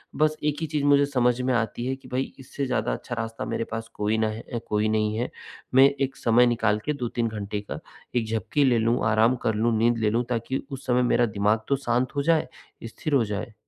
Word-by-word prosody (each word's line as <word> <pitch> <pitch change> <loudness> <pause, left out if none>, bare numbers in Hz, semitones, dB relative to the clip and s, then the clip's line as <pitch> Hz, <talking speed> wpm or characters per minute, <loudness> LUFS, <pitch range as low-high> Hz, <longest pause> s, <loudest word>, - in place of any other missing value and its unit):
बस 155 0 +2
एक 150 -1 0
ही 160 - -1
चीज़ 150 -1 -1
मुझे 145 0 +5
समझ 125 -3 +1
में 130 0 +1
आती 120 0 -1
हैं 130 +1 -1
कि, 135 - -16
भई 130 +1 -2
इससे 135 +1 -4
ज़्यादा 120 -3 0
अच्छा 120 - -5
रास्ता 115 0 -4
मेरे - - -2
पास 115 0 -4
कोई 105 +1 0
ना 110 0 +2
है 115 +2 -5
कोई 105 0 +1
नहीं 110 0 +1
है। 120 - -1 0.5
मैं 135 +1 +8
एक 135 0 0
समय 120 +1 +4
निकाल 110 -3 +1
के 150 - 0
2-3 120 -3 -2
घंटे 105 -1 -4
का 100 - -7 0.4
एक 115 -2 +1
झपकी 110 +6 0
ले 125 -3 +4
लूँ, 115 +2 +2
आराम 110 +3 +4
कर 110 - +2
लूँ, 115 +1 +1
नींद 115 +2 +3
ले 110 -2 +1
लूँ, 115 +3 +1
ताकि 125 +2 -2
उस 135 0 -7
समय 125 0 +3
मेरा 120 - +4
दिमाग़ 105 0 +1
तो 140 - +2
शांत 125 +3 +1
हो 140 - +1
जाए। 165 0 +2 0.4
स्थिर 145 +6 -4
हो 135 -4 +4
जाए। 105 +3 -4
120 Hz, 235 wpm, -25 LUFS, 110-130 Hz, 0.5 s, मैं